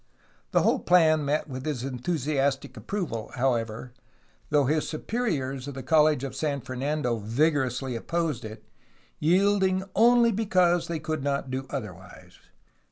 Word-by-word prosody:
The -, -, +2 dB
whole -, -, +3 dB
plan 160 Hz, -4 st, +4 dB
met 150 Hz, +2 st, 0 dB
with 130 Hz, -2 st, -6 dB
his 140 Hz, -5 st, -3 dB
enthusiastic 135 Hz, 0 st, -1 dB
approval, 170 Hz, -, -4 dB
however, 120 Hz, -2 st, -1 dB, 0.6 s
though 145 Hz, -2 st, +3 dB
his 150 Hz, +3 st, 0 dB
superiors 150 Hz, -, -2 dB
of 140 Hz, -, -6 dB
the 135 Hz, -, -6 dB
College 150 Hz, -1 st, +3 dB
of 135 Hz, -, -5 dB
San 145 Hz, -3 st, -2 dB
Fernando 130 Hz, 0 st, -2 dB
vigorously 130 Hz, +2 st, 0 dB
opposed 165 Hz, +1 st, -2 dB
it, 110 Hz, 0 st, -9 dB, 0.5 s
yielding 190 Hz, +2 st, +2 dB
only 235 Hz, +1 st, +5 dB
because 185 Hz, -5 st, +2 dB
they 170 Hz, -, -2 dB
could 155 Hz, -1 st, -3 dB
not 140 Hz, -2 st, -2 dB
do 130 Hz, +1 st, -3 dB
otherwise. 95 Hz, -9 st, -8 dB
145 Hz, 135 wpm, -26 LUFS, 130-165 Hz, 0.6 s, only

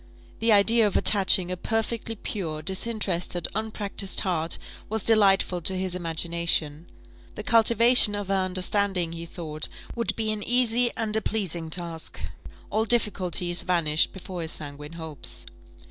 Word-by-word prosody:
The 225 Hz, 0 st, +1 dB
idea 220 Hz, +2 st, +4 dB
of 200 Hz, -, -1 dB
attaching 190 Hz, -3 st, +4 dB
a -, -, -2 dB
perfectly 225 Hz, +3 st, -2 dB
pure, 160 Hz, -7 st, -6 dB
disinterested, 190 Hz, -2 st, -2 dB
unpractised 210 Hz, -2 st, -1 dB
heart, 170 Hz, -3 st, -1 dB, 0.3 s
was 220 Hz, -1 st, -2 dB
delightful 195 Hz, -5 st, +2 dB
to 185 Hz, +3 st, -1 dB
his 185 Hz, -1 st, -1 dB
imagination: 170 Hz, -2 st, -1 dB, 0.5 s
the -, -, -7 dB
cultivation 230 Hz, -1 st, +6 dB
of 205 Hz, -2 st, -6 dB
her -, -, +1 dB
understanding, 185 Hz, -1 st, 0 dB
he 170 Hz, 0 st, -8 dB
thought, 155 Hz, -3 st, -4 dB, 0.3 s
would 235 Hz, -1 st, -2 dB
be 220 Hz, -1 st, -2 dB
an 215 Hz, -1 st, -4 dB
easy 245 Hz, +1 st, +1 dB
and 220 Hz, -2 st, -2 dB
a 220 Hz, -, 0 dB
pleasing 180 Hz, -7 st, -2 dB
task: 165 Hz, -1 st, -4 dB, 0.5 s
all 220 Hz, +2 st, 0 dB
difficulties 185 Hz, -6 st, 0 dB
vanished 165 Hz, -3 st, +1 dB
before 185 Hz, -2 st, -8 dB
his 160 Hz, -, -3 dB
sanguine 150 Hz, +1 st, -9 dB
hopes. 160 Hz, -4 st, -2 dB
190 Hz, 140 wpm, -25 LUFS, 170-220 Hz, 0.5 s, cultivation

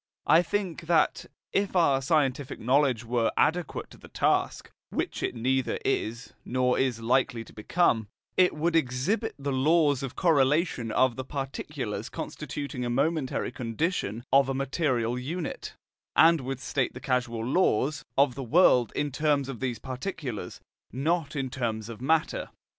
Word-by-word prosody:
I 160 Hz, +3 st, +6 dB
think 180 Hz, -3 st, -3 dB
that, 165 Hz, -2 st, +2 dB, 0.3 s
if 200 Hz, -1 st, 0 dB
our 140 Hz, -7 st, +4 dB
scientific 140 Hz, -1 st, 0 dB
knowledge 130 Hz, -1 st, +2 dB
were 115 Hz, -1 st, +1 dB
adequate 165 Hz, +1 st, 0 dB
to -, -, -14 dB
the -, -, -13 dB
task, -, -, 0 dB, 0.2 s
which -, -, -3 dB
it -, -, -2 dB
neither 130 Hz, +2 st, 0 dB
is 115 Hz, -2 st, -2 dB
nor 125 Hz, 0 st, +1 dB
is 125 Hz, -4 st, 0 dB
likely 120 Hz, -1 st, +1 dB
to -, -, -16 dB
become, 110 Hz, -, +1 dB, 0.3 s
it 185 Hz, -1 st, +4 dB
would 165 Hz, +2 st, 0 dB
exhibit 165 Hz, -, 0 dB
the 140 Hz, 0 st, -3 dB
laws 145 Hz, +1 st, +3 dB
of 135 Hz, -1 st, -5 dB
correlation 145 Hz, -6 st, +2 dB
of 130 Hz, +1 st, +2 dB
the 130 Hz, -, -3 dB
particulars 135 Hz, 0 st, -5 dB
constituting 140 Hz, -3 st, -5 dB
a 120 Hz, -, -2 dB
momentary 140 Hz, +2 st, 0 dB
condition 120 Hz, -, -2 dB
of 135 Hz, -1 st, +5 dB
a 135 Hz, -, -1 dB
material 130 Hz, -4 st, 0 dB
unit, 160 Hz, +7 st, -5 dB, 0.4 s
and 165 Hz, -1 st, +6 dB
would 130 Hz, 0 st, -4 dB
state 135 Hz, -2 st, -1 dB
the -, -, -6 dB
causal 120 Hz, -3 st, -1 dB
laws* 140 Hz, -2 st, +1 dB
of 140 Hz, -2 st, +4 dB
the 135 Hz, -, -6 dB
world 125 Hz, -, +4 dB
in 145 Hz, -1 st, -1 dB
terms 140 Hz, 0 st, +1 dB
of 135 Hz, -5 st, -6 dB
these 125 Hz, -3 st, -2 dB
particulars, 130 Hz, -, -5 dB, 0.3 s
not 155 Hz, +3 st, -1 dB
in 135 Hz, -3 st, -2 dB
terms 115 Hz, -3 st, -3 dB
of 115 Hz, 0 st, -8 dB
matter. 160 Hz, +4 st, 0 dB
135 Hz, 155 wpm, -27 LUFS, 125-155 Hz, 0.4 s, I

